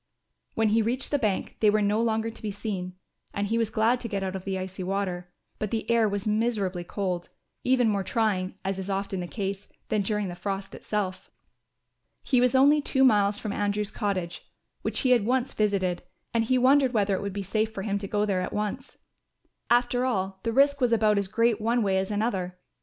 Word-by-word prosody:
When 220 -1 +2
he 225 +2 +3
reached 245 +4 -1
the 290 - +2
bank 210 -6 -1
they 215 - +5
were 215 +1 +3
no 210 +2 +2
longer 225 0 0
to - - -12
be 215 - -3
seen, 195 -3 -4 0.4
and 200 - 0
he 225 +3 0
was 225 -2 +1
glad 225 +3 +2
to 240 - -5
get 200 -3 -2
out 190 0 -3
of 190 - -6
the 195 -1 -2
icy 185 0 -5
water. 185 -2 -2 0.3
But 210 - -2
the 225 +1 -3
air 230 -2 +4
was 200 -1 -3
miserably 210 -5 0
cold, 180 -1 -3 0.3
even 250 -2 +3
more 200 -2 +1
trying, 195 -5 0
as 195 0 -1
is 190 +1 -5
often 195 -1 -2
the 175 - -4
case, 195 0 -4 0.2
than 215 -1 +1
during 210 0 -1
the 175 - -5
frost 195 +2 -4
itself. 195 -3 -3 0.9
He 255 -3 +2
was 250 +1 +3
only 285 +3 +5
two 265 -1 +2
miles 205 -5 +4
from 210 -1 -4
Andrew's 205 0 -1
cottage, 185 -5 -3 0.4
which - - -1
he 255 - +2
had 240 -4 +5
once 250 +3 0
visited, 195 -4 0 0.3
and 230 -1 +2
he 255 +3 +2
wondered 260 +1 +4
whether 200 -2 +2
it 190 - -1
would 200 0 -3
be 200 0 -3
safe 215 +3 0
for 195 -3 -5
him 200 -1 -1
to 200 - -5
go 210 +1 0
there 190 -3 0
at 180 - -4
once. 210 +6 -4 0.7
After 245 +1 +3
all, 190 -6 -1
the 230 - -1
risk 280 +3 +3
was 245 -2 +3
about 215 -2 +3
as 200 - -1
great 230 +1 +1
one 230 +2 +2
way 190 -2 +2
as 190 - -2
another. 200 -4 -1
210 Hz, 215 wpm, -27 LUFS, 195-230 Hz, 0.9 s, they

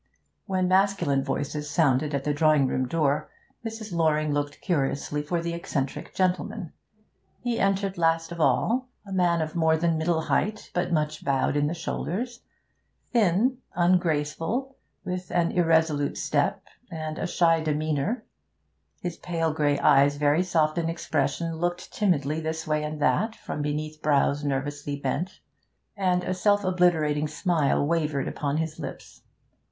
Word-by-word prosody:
When 185 -2 +1
masculine 185 -7 +2
voices 150 +2 -3
sounded 145 -2 +2
at 140 - -2
the 150 - 0
drawing 155 -2 +4
room 130 0 0
door, 145 -1 0 0.3
Mrs. 220 -3 -6
Loring 155 -2 +2
looked 145 0 -2
curiously 145 -3 -1
for 170 +3 -2
the 170 0 -2
eccentric 140 -5 -4
gentleman. 180 -3 -1 0.7
He 240 -1 -1
entered 195 -1 0
last 165 0 +2
of 170 -1 -4
all. 250 +10 +2 0.2
A 195 - -10
man 175 -3 +2
of 155 +1 -6
more 160 -1 +3
than 165 -1 +1
middle 160 0 +1
height, 210 +6 -1
but 180 0 -1
much 150 -2 -1
bowed 135 0 +1
in 145 0 +2
the 165 - -2
shoulders; 230 +8 -3 0.7
thin, 235 +4 +3 0.2
ungraceful, 175 - +1 0.3
with 180 0 -4
an 170 -1 +1
irresolute 160 -4 +2
step - - 0 0.3
and 155 -1 -5
a - - -1
shy 165 -2 +3
demeanour; 155 - -1 0.8
his 175 -2 -4
pale 165 -2 -1
grey 145 -2 +2
eyes, 140 +1 +5
very 145 +3 +3
soft 165 -3 +1
in 165 -1 -1
expression, 160 0 -1
looked 175 +1 -3
timidly 155 -7 +1
this 160 +1 -3
way 155 0 0
and 150 0 -4
that 220 +1 +2
from 150 - -5
beneath 150 +1 -3
brows 145 0 +2
nervously 145 +1 -2
bent, 145 +7 -3 0.5
and 180 -3 +1
a 185 - -1
self 205 +2 +2
obliterating 165 -5 +2
smile 155 -3 +1
wavered 150 -3 0
upon 145 0 -2
his 160 -1 -3
lips. - - -8
160 Hz, 145 wpm, -26 LUFS, 150-180 Hz, 0.8 s, eyes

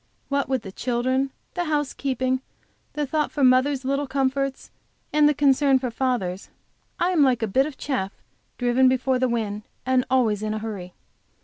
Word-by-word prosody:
What 280 -1 0
with 260 -4 0
the 195 - -8
children, 255 +5 0 0.2
the 350 -1 -2
housekeeping, 270 -4 -1 0.5
the 295 0 -1
thought 300 +2 -1
for 285 - -1
mother's 260 +1 +3
little 275 +1 0
comforts 270 0 -1 0.4
and 300 0 +5
the - - +3
concern 275 -1 +4
for 255 -2 -3
father's, 225 -8 -2 0.5
I 355 - +2
am 340 -5 +3
like 255 -4 +3
a - - +1
bit 265 +8 +2
of 290 -4 -9
chaff 250 -9 -2 0.5
driven 245 +1 +3
before 260 0 +1
the 255 0 +1
wind, 215 -3 -2 0.2
and 255 0 +3
always 230 -6 +2
in 215 0 -2
a - - -2
hurry. 205 -5 -6
260 Hz, 175 wpm, -24 LUFS, 240-275 Hz, 0.5 s, and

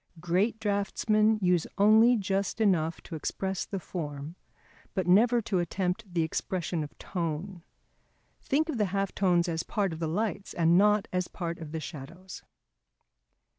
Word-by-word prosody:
Great 185 +7 0
draughtsmen 215 +1 +1
use 180 -2 +2
only 220 +4 +6
just 195 +1 -1
enough 170 -7 +1
to - - -12
express 190 +4 -3
the 195 - -4
form, 150 -3 -6 0.6
but 190 - 0
never 230 +6 +4
to 190 -3 0
attempt 180 +3 -2
the 170 -2 +1
expression 170 0 -2
of 145 - -10
tone. 170 +1 -4 0.8
Think 305 +4 +1
of 290 -8 -3
the 210 - +3
half 195 0 -2
tones 180 -3 +2
as 165 -1 -1
part 200 -3 -1
of 160 - -7
the 165 - -1
lights 205 +4 -2
and 170 0 +4
not 210 +2 +4
as 180 0 0
part 170 -1 -5
of 160 -2 -8
the 160 - -3
shadows. 170 +5 -9
185 Hz, 155 wpm, -29 LUFS, 170-205 Hz, 0.8 s, only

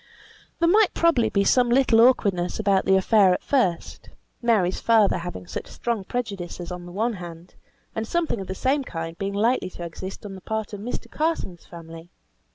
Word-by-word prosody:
There 335 - +2
might 415 +3 +4
probably 335 -9 +3
be 200 - +1
some 245 +4 +3
little 240 -2 +4
awkwardness 200 -8 +2
about 200 -3 +2
the 190 - +4
affair 190 -1 +4
at - - -7
first: 235 -12 -1 0.3
Mary's 215 -7 +2
father 220 -5 +3
having 175 +1 -7
such - - -6
strong 230 -5 -3
prejudices 190 -8 -5
on 175 0 -7
the - - -10
one 225 +6 -1
hand; 175 -2 -10 0.4
and 220 0 -3
something 330 -10 -1
of 190 - -7
the 190 - -4
same 270 +6 0
kind 165 -7 -6
being 195 0 -2
likely 220 -2 +1
to 175 - -9
exist 185 +5 -8
on 200 - -7
the 190 - -10
part 220 0 -4
of 205 - -5
Mr. 230 +5 -5
Carson's 305 - -3
family. 165 0 -11
200 Hz, 185 wpm, -24 LUFS, 180-240 Hz, 0.4 s, might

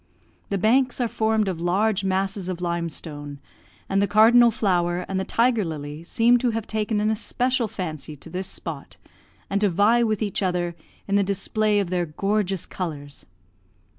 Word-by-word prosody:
The 200 - 0
banks 250 +7 +2
are 245 - +1
formed 220 -1 +1
of 175 -3 -3
large 195 +4 +1
masses 190 0 -1
of 180 -2 -4
limestone; 165 -4 -4 0.5
and 195 0 +1
the 200 - +2
cardinal 230 +3 +6
flower 180 -5 0
and 190 -1 -2
the - - -1
tiger 230 +1 +2
lily 150 -2 -6
seem 235 +7 +3
to 245 - +1
have 225 -1 -2
taken 215 -1 -1
an 215 +1 +1
especial 245 +3 0
fancy 155 -6 -6
to 140 - -13
this 185 +1 -3
spot, - - -7 0.5
and 200 0 -1
to 205 - +4
vie 205 +7 +3
with 220 -2 +1
each 205 -1 -1
other 175 -2 -1 0.3
in 200 0 +2
the 200 - +3
display 205 +2 +1
of 190 -3 -2
their 175 -2 0
gorgeous 195 +3 -1
colours. 145 -6 -6
195 Hz, 170 wpm, -24 LUFS, 175-220 Hz, 0.5 s, cardinal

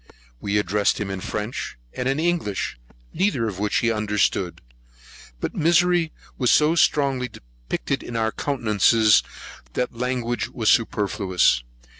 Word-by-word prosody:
We 100 +7 -1
addressed 105 +1 +1
him 100 -2 -3
in 95 -1 -4
French 105 - -4 0.2
and 125 +1 -2
in 135 +3 0
English, 160 - -1 0.3
neither 165 - +1
of 100 -3 -5
which 105 0 -1
he 120 - +2
understood; 105 -4 0 0.8
but - - -3
misery 170 0 +3 0.3
was 125 -3 +2
so 150 +1 +5
strongly 140 -6 +2
depicted - - -5
in 120 - -8
our 110 -1 +1
countenances, 110 -5 +3 0.5
that 125 - -2
language 120 0 -2
was 110 -3 0
superfluous. 100 - +2
115 Hz, 130 wpm, -23 LUFS, 105-135 Hz, 0.8 s, so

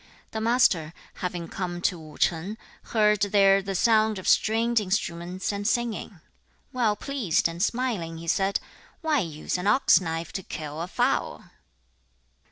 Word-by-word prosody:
The 220 - -3
Master, 220 -9 +2 0.3
having 175 -2 -3
come 175 -1 -4
to 180 - +1
Wu 155 -2 -12
ch'ang, 175 +6 0 0.3
heard 210 -2 +2
there 195 -1 +4
the 195 0 -4
sound 220 +1 +3
of 185 - -6
stringed 225 +2 +3
instruments 185 -2 -2
and 205 0 -3
singing. 235 -1 -1 0.6
2. - - -36
Well 230 -5 +2
pleased 225 - 0
and 165 +1 -6
smiling, 215 -8 -1
he 165 +1 -9
said, 195 +3 +1 0.4
'Why 315 -3 +2
use 165 -1 -3
an 180 - -2
ox 210 -1 +5
knife 165 -1 -4
to 190 - -3
kill 155 -3 -6
a 170 - -3
fowl?' - - 0
195 Hz, 155 wpm, -26 LUFS, 170-220 Hz, 0.6 s, ox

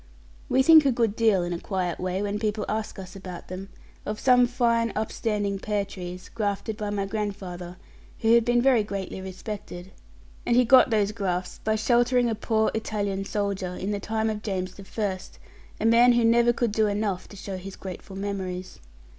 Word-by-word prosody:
We 265 - +4
think 315 +1 +8
a 275 - +3
good 230 -4 +1
deal, 220 -6 +3
in 175 0 -2
a 170 - -3
quiet 185 -3 -2
way, 185 +2 -2
when 205 0 -2
people 215 -1 -1
ask 220 0 -3
us 185 -1 -9
about 185 -2 -9
them 190 +2 -7 0.3
of 210 - -4
some 250 -1 +5
fine, 235 -2 +1
upstanding 210 -2 -1
pear 205 0 -1
trees, 180 -2 -8
grafted 210 0 -2
by 210 -1 -4
my 200 -1 -1
grandfather, 195 -4 -5 0.4
who 225 0 +4
had 235 0 +6
been 240 +1 +2
very 260 -4 +5
greatly 195 -2 -5
respected. 190 -1 -7 0.5
And 235 - +1
he 250 0 +5
got 255 +2 +7
those 210 -2 +2
grafts 185 -4 -3
by 220 0 +1
sheltering 240 +2 +2
a - - +1
poor 220 0 +1
Italian 200 -3 -2
soldier, 195 -3 -2
in 195 +3 -3
the 205 - -1
time 220 +2 -1
of 210 -1 -5
James 185 -3 -3
the 195 +1 -12
First, 190 -2 -4 0.4
a - - -1
man 235 +2 +6
who 235 -1 +3
never 235 +1 +5
could 240 -1 0
do 215 0 +2
enough 205 -3 -2
to - - -13
show 190 0 -5
his 190 +1 -8
grateful 190 +1 -8
memories. 190 -2 -4
205 Hz, 190 wpm, -26 LUFS, 190-225 Hz, 0.5 s, think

